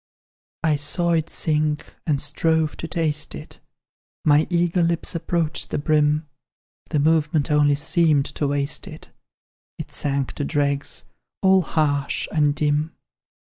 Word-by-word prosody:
"I 155 -2 +2
saw 170 +4 +1
it 165 -1 +1
sink, 150 -1 -1
and 145 -3 +1
strove 155 +2 0
to 165 - -5
taste 155 -3 -1
it, - - -10 0.7
My 150 +1 +4
eager 175 0 +1
lips 170 +1 0
approached 165 -2 -1
the - - -2
brim; 150 +1 +1 0.6
The 155 - 0
movement 150 0 +2
only 145 -1 +4
seemed 150 -1 +2
to 145 - -2
waste 140 +1 -2
it; - - -11 0.7
It - - -7
sank 140 -2 -1
to - - 0
dregs, 140 -1 -1 0.4
all 190 0 +5
harsh 145 -4 0
and 150 -2 +2
dim. 150 +2 0
150 Hz, 135 wpm, -22 LUFS, 145-165 Hz, 0.7 s, all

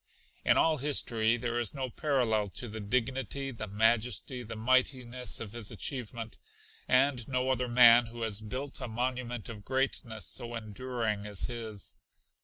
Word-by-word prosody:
In - - +4
all 160 -1 +4
history 120 -5 +2
there 120 0 -1
is 120 +4 -1
no 130 -3 -3
parallel 120 -9 +1
to 120 +6 -6
the 110 0 -6
dignity, 130 +4 -1
the 110 -3 -5
majesty, 115 +3 +1
the 115 -1 -7
mightiness 125 +1 +1
of 110 -3 -6
his 115 -2 -6
achievement, 115 -4 -5 0.5
and 130 -2 +3
no 130 0 0
other 125 -1 0
man 120 -1 +8
who 115 0 -6
has 110 -1 0
built 130 +6 -6
a - - -3
monument 120 -1 -3
of 110 -3 -8
greatness 130 -3 -2
so 120 -2 -5
enduring 110 -1 -3
as 100 -3 -2
his. 110 -5 -6
120 Hz, 155 wpm, -31 LUFS, 110-130 Hz, 0.5 s, man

